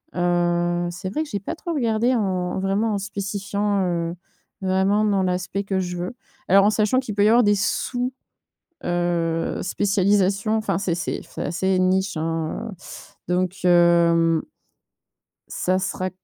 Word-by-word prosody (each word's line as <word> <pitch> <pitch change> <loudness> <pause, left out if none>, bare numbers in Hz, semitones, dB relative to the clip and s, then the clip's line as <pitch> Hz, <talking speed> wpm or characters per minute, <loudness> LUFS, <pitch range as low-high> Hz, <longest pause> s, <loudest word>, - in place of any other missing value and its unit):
heu, 175 0 +1
c'est 185 +2 -6
vrai 310 +8 -1
que 305 - -10
j'ai 205 - -2
pas 205 - -5
trop 340 +1 -5
regardé 235 -2 +1
en 230 - +1
en 185 -1 -1
vraiment, 200 +3 0
en 205 - 0
spécifiant, 200 0 -2
heu, 170 -1 -1 0.5
vraiment 190 +2 +2
dans 200 -2 +2
l'aspect 180 +2 -2
que 195 -1 -1
je 180 -1 -3
veux. 180 +7 -4 0.3
Alors 195 +1 +6
en 210 - +5
sachant 215 +4 +2
qu'il 225 -6 -5
peut 205 - +3
y - - +5
avoir 240 +2 +5
des 205 -1 +4
sous, 245 +5 -1 0.7
heu, 170 -1 0
spécialisations. 200 +2 +1
Enfin, 215 -5 -1
c'est 190 -4 -1
c'est 180 - -3
f - - -20
c'est - - -4
assez 190 +2 0
niche, 190 0 +1
hein, 165 +7 -3
heu - - -9 0.6
donc 185 0 -2
hem, 170 -2 +4 1.1
ça 185 +1 0
sera 185 0 -2
190 Hz, 165 wpm, -23 LUFS, 175-205 Hz, 1.1 s, Alors